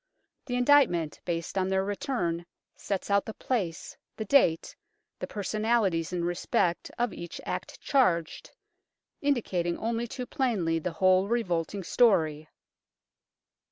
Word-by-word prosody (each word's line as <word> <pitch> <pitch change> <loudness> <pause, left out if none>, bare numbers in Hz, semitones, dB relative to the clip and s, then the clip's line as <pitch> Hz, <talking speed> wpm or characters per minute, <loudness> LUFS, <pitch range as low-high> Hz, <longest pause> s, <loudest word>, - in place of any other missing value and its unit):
The 245 - -2
indictment 245 - +3
based 170 +2 -2
on 185 - +1
their 190 0 +1
return 180 -5 -2 0.3
sets 200 0 -3
out 200 0 +4
the 220 - -6
place, 190 -11 -3 0.2
the 220 - -3
date, 195 - +3 0.4
the - - -4
personalities 210 -5 0
in 175 -1 -1
respect 175 0 0
of 240 -4 0
each 170 0 -7
act - - -5
charged, 180 - +1 0.7
indicating 190 -11 0
only 230 +1 -2
too 250 +2 -5
plainly 200 -12 0
the 170 +1 -4
whole 185 +2 +3
revolting 195 -4 -1
story. 160 -9 +2
190 Hz, 120 wpm, -28 LUFS, 170-235 Hz, 0.7 s, out